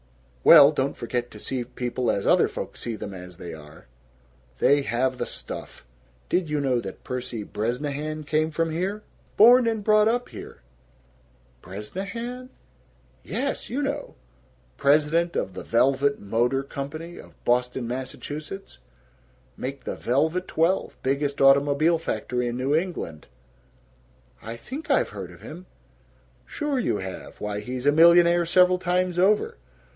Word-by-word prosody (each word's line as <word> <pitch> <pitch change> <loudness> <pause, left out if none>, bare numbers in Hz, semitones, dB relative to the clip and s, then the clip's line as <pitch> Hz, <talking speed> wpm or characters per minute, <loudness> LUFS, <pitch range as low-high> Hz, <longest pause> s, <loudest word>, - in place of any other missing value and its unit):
"Well, 150 -3 +9
don't 140 -2 -2
forget 120 +1 -3
to 105 - -12
see 125 +3 -3
people 125 0 -3
as 100 - 0
other - - +4
folks - - -7
see 115 -2 -4
them 100 -2 -7
as 90 -1 -10
they 85 -3 -8
are! 75 -2 -13 0.7
They 145 - +4
have 130 +1 -1
the - - -2
stuff. - - -8 0.4
Did 180 -3 0
you 150 -1 0
know 130 -3 +1
that 95 -4 -8
Percy 125 -3 -4
Bresnahan 145 +9 -3
came 155 +1 +1
from 165 +1 -1
here? 190 +6 -2 0.3
Born 240 +3 +7
and 220 -2 -1
brought 215 0 +4
up 245 +2 0
here!" - - -11 1.0
"Bresnahan?" 200 - -6 0.7
"Yes 280 +1 -3
you 275 +5 -2
know 280 +1 -4 0.6
president 155 +4 +2
of 95 - -2
the - - -7
Velvet 135 +4 +2
Motor 120 +6 0
Company 155 +5 -7
of - - -15
Boston, 125 0 +1
Mass. 130 +2 -4 1.4
make 135 +1 -6
the - - -4
Velvet 160 +9 0
Twelve 170 +4 0
biggest 140 +1 -1
automobile 140 +4 +4
factory 125 -4 -2
in 120 0 -3
New 130 +3 0
England." 155 - -2 1.1
"I 115 +1 -7
think 280 - -8
I've 275 - +3
heard 95 -3 -7
of 85 -1 -15
him." 175 +4 -10 0.8
"Sure 295 -3 -2
you 225 - 0
have. 95 -1 -8
Why, 105 0 -3
he's 125 +4 -5
a 145 - +6
millionaire 170 +2 +6
several 180 +1 +4
times 180 0 0
over! 200 - +2
140 Hz, 140 wpm, -25 LUFS, 120-175 Hz, 1.4 s, Well